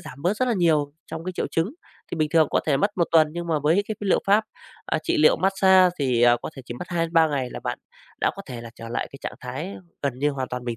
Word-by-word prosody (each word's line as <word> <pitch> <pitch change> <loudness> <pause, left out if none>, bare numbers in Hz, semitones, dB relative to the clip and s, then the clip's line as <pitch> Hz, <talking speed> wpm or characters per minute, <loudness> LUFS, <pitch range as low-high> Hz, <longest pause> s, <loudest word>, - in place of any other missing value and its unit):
giảm 140 - -11
bớt 185 +5 +1
rất 255 +2 +1
là 240 - +2
nhiều 155 -6 +2
trong 160 0 -7
cái 185 - -3
triệu - - -2
chứng. 170 - -1 0.4
Thì - - -2
bình 155 -1 +1
thường 160 -3 +5
có - - +2
thể 145 -3 +3
mất 200 +9 +1
1 175 - +3
tuần 160 -2 +5
nhưng 170 +1 -5
mà 160 -2 +1
với 160 +7 +2
cái 215 - -2
liệu 200 -2 +2
pháp, 205 +2 +4 0.4
ờ, - - 0
trị - - 0
liệu 155 - +5
mát-xa 190 -1 +4
thì, 125 -4 +1
à, 120 0 +6
có - - -5
thể 135 - -8
chỉ 120 - -7
mất 180 - -7
2 170 -2 0
đến 165 - -13
3 165 -2 +5
ngày 135 -4 -2
là - - -7
bạn - - -4 0.4
đã - - +3
có - - -7
thể 125 -2 -7
trở 115 0 -9
lại 115 - -3
cái - - -10
trạng - - -4
thái 100 - -5 0.3
gần 135 -3 -2
như 145 +2 +2
hoàn 130 -3 -4
toàn 125 0 -5
bình 120 -1 -3
160 Hz, 290 wpm, -24 LUFS, 135-180 Hz, 0.4 s, à